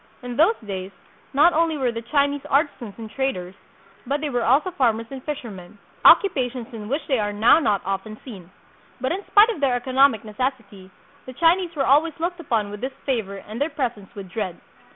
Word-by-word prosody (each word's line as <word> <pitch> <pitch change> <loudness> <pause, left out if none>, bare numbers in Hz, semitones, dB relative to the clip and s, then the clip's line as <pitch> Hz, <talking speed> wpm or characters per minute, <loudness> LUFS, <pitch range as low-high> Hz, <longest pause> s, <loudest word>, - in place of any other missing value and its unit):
In 245 -1 -5
those 330 - +4
days, 190 -2 -5 0.4
not 300 +5 +5
only 320 -1 +1
were 255 -3 0
the 230 0 -5
Chinese 280 +3 0
artisans 270 - 0
and 225 -1 -7
traders, 215 -7 -3 0.5
but 285 +3 0
they 295 -1 -3
were 245 -2 0
also 285 +11 +3
farmers 230 -7 +1
and 265 -1 -8
fishermen, 210 -10 -7 0.3
occupations 255 - +4
in 215 -2 -7
which 285 +3 -2
they 265 -5 +1
are 205 -1 -1
now 220 +9 +5
not 210 - 0
often 195 +3 -4
seen. 195 -9 -10 0.5
But 260 - -1
in 385 +4 -3
spite 420 +3 +6
of 445 - -3
their 265 -3 +2
economic 260 -1 +3
neces 240 +5 -1
sity, 195 -4 -16 0.4
the 255 - -8
Chinese 340 +3 +2
were 275 -2 0
always 305 +3 +3
looked 350 +2 -2
upon 225 -10 -1
with 205 +1 -8
disfavor 245 -6 -3
and 220 +5 -7
their 295 - +1
presence 240 -10 -4
with 200 -2 -8
dread. 185 -2 -4
255 Hz, 195 wpm, -23 LUFS, 215-290 Hz, 0.5 s, spite